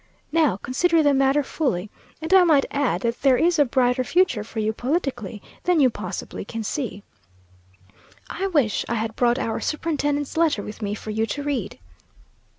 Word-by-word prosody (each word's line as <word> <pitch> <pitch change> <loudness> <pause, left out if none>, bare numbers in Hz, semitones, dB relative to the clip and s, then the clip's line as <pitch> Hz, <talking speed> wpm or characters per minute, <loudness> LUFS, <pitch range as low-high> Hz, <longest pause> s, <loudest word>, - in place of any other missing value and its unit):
Now 300 - +2
consider 320 - +1
the 290 -1 +4
matter 275 +2 +3
fully, 215 - -2 0.3
and 325 +3 -1
I 380 -1 +8
might 305 -5 +4
add 280 -2 0
that 235 0 -2
there 270 -2 +4
is 340 +2 +2
a 290 - +6
brighter 250 0 +1
future 320 - +2
for 225 - -12
you 220 0 0
politically 245 - -3 0.2
than 355 -2 +3
you 260 -4 +5
possibly - - -6
can 225 -1 -5
see. 215 -4 -4 1.2
I 390 - -3
wish 285 - +1
I 235 - 0
had 220 0 -3
brought 240 0 +2
our 225 - -2
superintendent's 290 -2 -2
letter 320 -11 +2
with 210 +2 -9
me 205 0 -2
for 215 - -7
you 220 +1 0
to 285 +7 -4
read. 280 -8 -3
265 Hz, 175 wpm, -23 LUFS, 225-305 Hz, 1.2 s, I